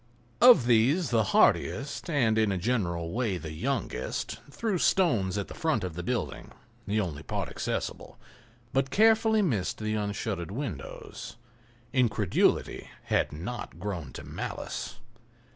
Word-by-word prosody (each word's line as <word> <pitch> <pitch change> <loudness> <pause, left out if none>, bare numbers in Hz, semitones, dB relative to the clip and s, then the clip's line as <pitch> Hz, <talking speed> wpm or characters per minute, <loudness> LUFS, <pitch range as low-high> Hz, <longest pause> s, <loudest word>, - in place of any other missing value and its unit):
Of 240 - +8
these 125 +7 +3
the 115 -3 +3
hardiest, 140 - +2
and 125 -8 +2
in 110 -2 +2
a 95 - 0
general 85 -6 -1
way 110 -3 0
the 80 -3 -7
youngest, 115 - -3
threw 195 +5 -1
stones 110 - +2
against 100 - -3
the - - -7
front 155 -10 0
of 90 -3 -3
the 90 - -5
building, 120 +7 -3 0.3
the 105 +2 +1
only 85 -8 -3
part - - -3
accessible, - - -4 0.6
but 135 0 +1
carefully 220 +1 +4
missed 110 - 0
the 110 0 -2
unshuttered 100 -4 -2
windows. 105 - -6 0.6
Incredulity 110 -7 +1
had - - +1
not 90 +5 -6
grown 85 -8 -4
to - - -8
malice. - - -5
110 Hz, 135 wpm, -28 LUFS, 95-140 Hz, 0.6 s, Of